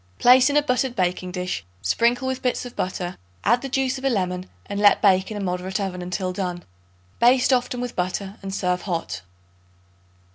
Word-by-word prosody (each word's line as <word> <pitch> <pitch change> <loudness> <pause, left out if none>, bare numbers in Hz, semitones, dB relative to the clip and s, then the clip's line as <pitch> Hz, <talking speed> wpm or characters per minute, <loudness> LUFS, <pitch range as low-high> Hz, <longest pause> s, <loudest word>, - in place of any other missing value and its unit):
Place 255 +2 +6
in 285 - +2
a 295 - +4
buttered 255 -2 0
baking 180 0 -1
dish; 180 - -3 0.2
sprinkle 235 - +2
with 260 0 -2
bits 250 0 -1
of 245 - -9
butter; 180 -1 -3 0.3
add 240 +3 +3
the 270 - -5
juice 265 0 0
of - - -13
a 270 - +3
lemon, 185 -5 -1 0.2
and 200 0 -4
let 205 -1 +6
bake 190 -2 +3
in 215 - -5
a - - -3
moderate 185 +1 -2
oven 190 -2 -3
until 185 +1 -3
done. 180 -2 -3 0.6
Baste 250 +2 +5
often 250 0 0
with 245 -1 -4
butter 190 +2 -2
and 195 -1 -5
serve 180 -2 0
hot. 170 -4 -3
200 Hz, 190 wpm, -23 LUFS, 180-250 Hz, 0.6 s, Place